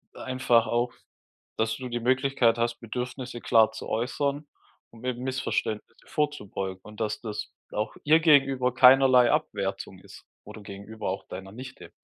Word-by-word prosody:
einfach 125 -3 +2
auch, 120 +1 0 0.6
dass 110 0 0
du 130 -1 -6
die 120 0 -2
Möglichkeit 130 -1 +2
hast, 120 0 -1
Bedürfnisse 125 +1 -5
klar 110 -2 +4
zu 110 - -8
äußern, 140 +5 -2 0.4
um 115 +2 -13
eben 125 0 -3
Missverständnisse 130 -4 -3
vorzubeugen. 100 -10 -3
Und, 105 +1 -12
dass 110 -1 -2
das 105 -2 -5 0.2
auch 105 +1 -3
ihr 155 +2 +5
gegenüber 135 -5 +4
keinerlei 130 -1 +6
Abwertung 95 -2 -2
ist - - -15 0.2
oder 110 - -11
gegenüber 100 +1 -7
auch 95 - -5
deiner 95 +1 -8
Nichte. 125 +4 -10
120 Hz, 145 wpm, -27 LUFS, 110-130 Hz, 0.6 s, keinerlei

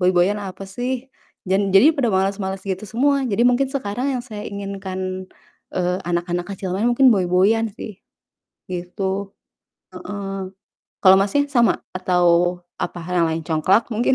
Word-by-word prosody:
boy-boyan 180 +2 +3
apa 195 0 -7
sih, 250 +5 -4 0.4
jan 195 +1 +2
jadi 265 +12 +7
pada 265 -5 +1
males-males 190 0 -1
gitu 190 +1 -3
semua. 275 +6 +2
Jadi, 210 +2 +1
mungkin 255 +2 +2
sekarang 260 0 -2
yang 245 - -4
saya 215 -4 -7
inginkan, 190 -2 -5 0.5
eee, 180 0 0
anak-anak 175 0 -1
kecil 190 -1 -5
main 215 +5 +1
mungkin 260 +2 +5
boy-boyan 195 +4 +2
sih, 210 -3 -9 0.7
gitu, 190 +2 -3 0.6
heeh. 195 -2 -5 0.5
Kalau 190 -1 +8
Masnya, 285 +9 +1
sama? 240 -4 +3 0.2
Atau, 180 -1 +1 0.6
apa 175 - -3
hal 180 0 +1
yang - - +1
lain, 160 0 -2
congklak 185 +8 +2
mungkin? 235 +4 +2
195 Hz, 145 wpm, -21 LUFS, 185-225 Hz, 0.7 s, Kalau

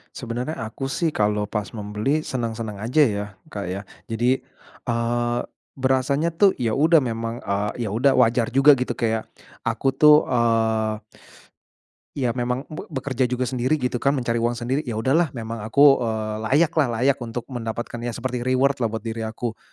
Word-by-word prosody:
Sebenarnya 125 +5 -4
aku 115 +5 -4
sih 170 - 0
kalau 105 0 +1
pas 105 -1 -3
membeli 105 +7 -1
senang-senang 115 -7 -4
aja 130 +7 +3
ya 105 -2 -2 0.2
Kak 100 - -5
ya. 95 +2 -3 0.3
Jadi, 120 +4 +1 0.4
eee, 120 0 0 0.3
berasanya 135 +5 0
tuh 195 +3 +5
ya 115 -3 0
udah 160 +3 +5
memang, 115 -2 -3
eee, 105 +4 -2
ya - - -3
udah 135 +4 +4
wajar 120 0 +3
juga 135 +3 +6
gitu 125 -1 -2
kayak 110 -1 -1 0.4
aku 135 -1 0
tuh, 150 0 +6
eee, 115 -2 +2 1.2
iya 130 -4 0
memang 125 +2 -2
be 155 - -7
bekerja 130 -3 -1
juga 125 +1 -1
sendiri 130 +3 +1
gitu 125 -1 0
kan, 140 +3 +2
mencari 120 -3 0
uang 120 +1 +1
sendiri, 125 +4 -1
ya 120 - -3
udahlah 135 +10 +2
memang 115 -1 -5
aku, 140 +4 +6
eee, 110 -1 -2 0.2
layakla, 155 -1 +3 0.2
layak 140 +1 +3
untuk 120 0 -5
mendapatkan 120 -1 -4
ya 120 -1 -4
seperti 125 0 -3
reward-lah 130 0 +2
buat 110 -1 -4
diri 115 0 -4
aku. 110 +1 -5
120 Hz, 165 wpm, -23 LUFS, 115-135 Hz, 1.2 s, juga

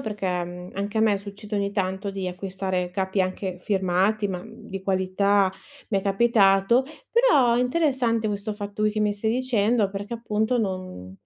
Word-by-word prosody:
perché, 210 -3 -4 0.2
mhmm, 180 +1 -9
anche 205 +3 -2
a - - +3
me 215 -2 +3
succede 205 +1 -7
ogni 200 0 -1
tanto, 190 0 -2
di 190 -2 -3
acquistare 185 0 -3
capi, 190 +1 -1
anche 185 0 -2
firmati, 195 +2 +1
ma, 180 -2 -3
mhmm, 225 0 -13
di 195 0 -5
qualità, 190 +1 +2 0.4
mi 200 -4 +1
è - - -2
capitato. 200 +2 +4 0.3
Però, 460 - +4
è - - +2
interessante 250 -5 +1
questo 205 +1 -3
fatto 205 0 -4
che 215 0 +1
mi 210 -1 +2
stai 215 +2 -1
dicendo, 230 -4 +1
perché, 205 +4 -5
appunto, 225 +1 0
non 185 - -4
200 Hz, 170 wpm, -25 LUFS, 190-220 Hz, 0.4 s, capitato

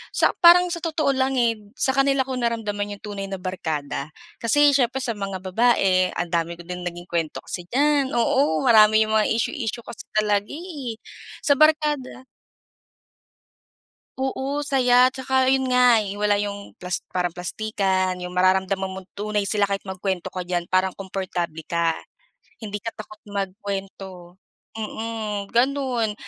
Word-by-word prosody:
Sa - - +4
parang 355 0 +7
sa 340 - -3
totoo 315 -4 0
lang, 265 0 0
eh, 235 -2 +3 0.2
sa 265 - +2
kanila 275 0 +3
ko 265 - -4
naramdaman 205 -3 -2
'yong - - -33
tunay 200 -2 -5
na 195 - -4
barkada. 155 -6 -3 0.3
Kasi, 290 +5 +5
siyempre 265 -1 +1
sa 245 - -1
mga 195 -1 -4
babae 190 -2 +3
ang 175 - -2
dami 170 0 0
ko 175 - -11
din 180 0 -6
naging 175 0 -5
kuwento 165 -3 -2
kasi 180 - -6
diyan, 285 0 +2
oo 235 - +2
marami 215 -2 +6
'yong 215 - -3
mga 215 - +3
issue-issue 230 +1 -2
kasi 235 - -9
talaga, 210 -1 +1
eh. 295 -8 -6 0.5
Sa 285 - +5
barkada 300 -4 +2 1.9
Oo, 270 +2 -2
saya 255 -3 +4
'tsaka 260 0 +1
'yon 265 0 +2
nga 250 -2 +6 0.2
wala 205 -1 +3
'yong 205 0 -5
plas 180 0 -3
parang 180 -2 -1
plastikan, 190 0 -1
'yong 180 - -5
mararamdaman 190 +1 +2
mong 190 0 -8
tunay 210 0 -1
sila 205 -2 +2
kahit 200 0 -2
magkuwento 190 -1 -3
ka 180 -1 -5
diyan 175 -1 -2
parang 185 0 +2
komportable 180 -4 -4
ka. 170 -1 0 0.7
Hindi 210 -1 -4
ka 225 +2 -6
takot 215 -1 -10
magkuwento, 195 -2 -6 0.4
mm, 215 -2 -4
gano'n. 245 -3 +1
210 Hz, 150 wpm, -23 LUFS, 185-260 Hz, 1.9 s, parang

